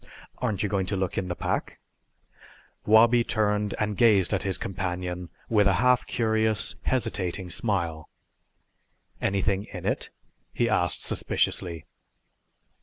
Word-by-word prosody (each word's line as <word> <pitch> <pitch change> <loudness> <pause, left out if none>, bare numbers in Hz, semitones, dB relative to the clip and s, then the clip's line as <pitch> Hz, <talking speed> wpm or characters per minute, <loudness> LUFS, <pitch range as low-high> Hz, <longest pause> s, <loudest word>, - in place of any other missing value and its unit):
"Aren't 105 -2 -1
you - - +1
going 100 -2 -1
to 100 - -1
look 95 -2 -2
in 95 - -4
the 90 - -3
pack?" - - -3 1.1
Wabi 115 +2 +6
turned 105 -2 0
and 105 -1 -1
gazed 105 -4 +4
at 95 - +1
his 95 -2 0
companion 90 -1 -4 0.2
with 105 -3 +3
a 95 - +3
half 125 +2 +3
curious 110 -2 0
hesitating 95 -7 -2
smile. 85 -7 -1 1.1
"Anything 100 +1 0
in - - -9
it?" - - -1 0.4
he 120 - 0
asked 90 -6 +1
suspiciously. 85 -4 0
100 Hz, 125 wpm, -26 LUFS, 90-110 Hz, 1.1 s, Wabi